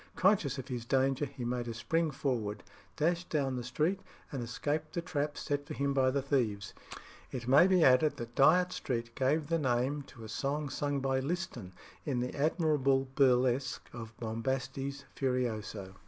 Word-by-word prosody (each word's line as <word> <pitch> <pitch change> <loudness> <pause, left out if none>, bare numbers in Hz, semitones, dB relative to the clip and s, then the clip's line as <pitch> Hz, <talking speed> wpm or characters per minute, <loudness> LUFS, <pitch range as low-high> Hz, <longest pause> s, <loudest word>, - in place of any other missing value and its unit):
Conscious 185 - +3
of 130 - -6
his 125 -3 -4
danger, 135 +3 +1
he 130 -2 -7
made 120 0 -2
a 115 - -4
spring 165 +7 0
forward, 120 -7 -2 0.3
dashed 170 +3 0
down 135 -4 0
the 125 - -3
street, 155 +10 0 0.3
and 135 - -3
escaped 145 +6 -2
the 170 - -1
trap 150 -4 -2
set 145 0 -2
for - - -5
him 140 0 0
by 130 -1 +3
the 135 +1 0
thieves. 115 -8 0 0.6
It 125 -2 -5
may 140 +8 +7
be 185 -3 +4
added 135 +3 +5
that 120 0 -7
Dyot 175 +8 +5
Street 115 -2 -3
gave 145 +5 +1
the 165 +2 0
name 130 +1 +1
to 115 -4 -12
a - - -7
song 140 +5 -2
sung 145 0 -1
by 135 0 +1
Liston 130 - -4 0.3
in 135 -5 -1
the 125 +1 -2
admirable 140 -3 +2
burlesque 130 -1 +2
of 115 -2 -8
"Bombastes 135 +4 -3
Furioso." 110 -7 -2
135 Hz, 170 wpm, -32 LUFS, 125-150 Hz, 0.6 s, may